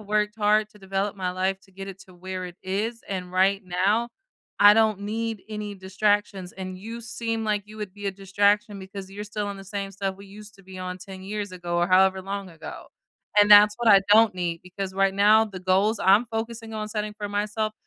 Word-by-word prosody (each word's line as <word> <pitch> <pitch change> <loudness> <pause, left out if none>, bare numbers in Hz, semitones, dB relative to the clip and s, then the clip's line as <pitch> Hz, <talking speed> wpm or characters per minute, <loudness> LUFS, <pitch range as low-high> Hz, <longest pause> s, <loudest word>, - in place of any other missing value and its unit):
worked 210 0 -1
hard 210 0 +3
to 210 - -19
develop 195 +1 -2
my 185 -2 -2
life 190 +1 -1
to 190 - -23
get 195 +1 -8
it 195 -1 -9
to 190 -1 -15
where 185 +1 -6
it 175 -1 -9
is, 215 +5 -3
and 180 -2 -5
right 195 +2 +3
now, 195 +6 +1 0.5
I 205 +1 +8
don't 220 -2 +3
need 220 +1 -3
any 210 -1 -5
distractions, 195 0 -1
and 185 -1 -7
you 225 +4 -7
seem 230 -1 -3
like 210 -1 0
you 215 +1 -12
would 205 -2 -6
be 205 - -10
a 195 - +1
distraction 200 +2 +1
because 190 0 -9
you're 205 +1 -7
still 210 0 -4
on 200 - -5
the 195 - -10
same 195 0 -4
stuff 195 0 -3
we 200 +1 -13
used 210 +1 -12
to 195 - -18
be 185 0 -11
on 185 0 -5
10 190 0 -10
years 205 0 -5
ago 175 -1 -3
or 175 - +2
however 190 +1 +4
long 195 -1 -5
ago. 165 -2 -10 0.5
And 205 0 +4
that's 210 0 +9
what 240 -1 +1
I 200 -2 +8
don't 220 -2 +6
need 170 -2 -3
because 190 +1 -6
right 195 0 +2
now, 210 +2 +5
the 190 -3 -9
goals 195 +4 +2
I'm 200 +6 +5
focusing 225 0 -5
on 215 0 -4
setting 210 -1 -3
for 210 - -4
myself, 210 +1 -1
200 Hz, 220 wpm, -25 LUFS, 190-210 Hz, 0.5 s, that's